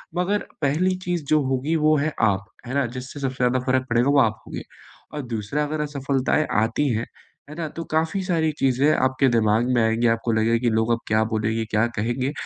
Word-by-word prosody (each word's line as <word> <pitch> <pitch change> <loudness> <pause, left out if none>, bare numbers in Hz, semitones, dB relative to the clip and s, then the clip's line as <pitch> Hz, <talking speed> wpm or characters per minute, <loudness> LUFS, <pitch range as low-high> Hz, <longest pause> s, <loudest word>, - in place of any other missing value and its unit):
मगर 190 +4 0 0.2
पहली 165 +7 +1
चीज़ 175 -2 -1
जो 155 -1 +4
होगी 135 +5 0
वो 155 -1 +3
है 150 +1 -1
आप, 100 -2 +2 0.2
है 125 - -5
ना? 140 -1 +1
जिससे 130 +3 -7
सबसे 135 -2 -2
ज़्यादा 125 +1 +2
फ़र्क 130 0 +1
पड़ेगा 120 +3 +2
वो 140 0 +4
आप 110 -2 0
होंगे। - - -6 0.5
और 150 - -3
दूसरा 110 +7 -1
अगर 150 +1 -2
असफलताएँ 140 0 0 0.2
आती 115 +6 0
हैं, 115 +2 -2 0.4
है 150 - -9
ना? 165 -1 -3
तो 165 - -6
काफ़ी 160 +5 0
सारी 165 -4 +1
चीज़ें 135 +3 +3
आपके 130 +1 +2
दिमाग 110 +3 +2
में 120 - +3
आएँगी, 115 +2 +2
आपको 115 +1 -3
लगेगा 115 +1 +2
कि - - +3
लोग 110 +1 +1
अब 115 - -1
क्या 110 0 +2
बोलेंगे, 110 +1 -1
क्या 110 +1 +1
कहेंगे? 120 +4 -1
130 Hz, 205 wpm, -23 LUFS, 115-150 Hz, 0.5 s, जो